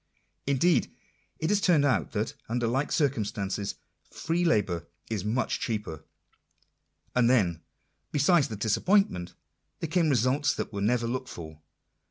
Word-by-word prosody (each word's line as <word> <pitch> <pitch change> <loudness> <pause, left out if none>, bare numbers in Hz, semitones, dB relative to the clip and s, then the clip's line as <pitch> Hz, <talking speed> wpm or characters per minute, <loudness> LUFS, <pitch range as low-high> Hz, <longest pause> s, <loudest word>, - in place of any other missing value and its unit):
Indeed 140 +5 +2 0.5
it 160 - -1
has 205 -1 +2
turned 165 -7 +4
out 105 - +1
that, - - -1 0.2
under 120 +1 0
like 130 +5 0
cir 150 -4 +4
cumstances, 105 -5 -3 0.3
free 170 +2 -1
labour 95 - +1 0.2
is 105 -5 -1
much 110 +5 -1
cheaper. 105 - -4 1.1
And 120 -1 +4
then, 90 -10 +2 0.5
besides 150 +1 +4
the 110 - -5
disappointment, 110 - +1 0.4
there 165 - -2
came 165 -1 +2
results 130 +3 +2
that - - -4
were 100 - -3
never 120 +3 +2
looked 130 +2 -3
for. 80 -2 -9
120 Hz, 140 wpm, -28 LUFS, 100-150 Hz, 1.1 s, turned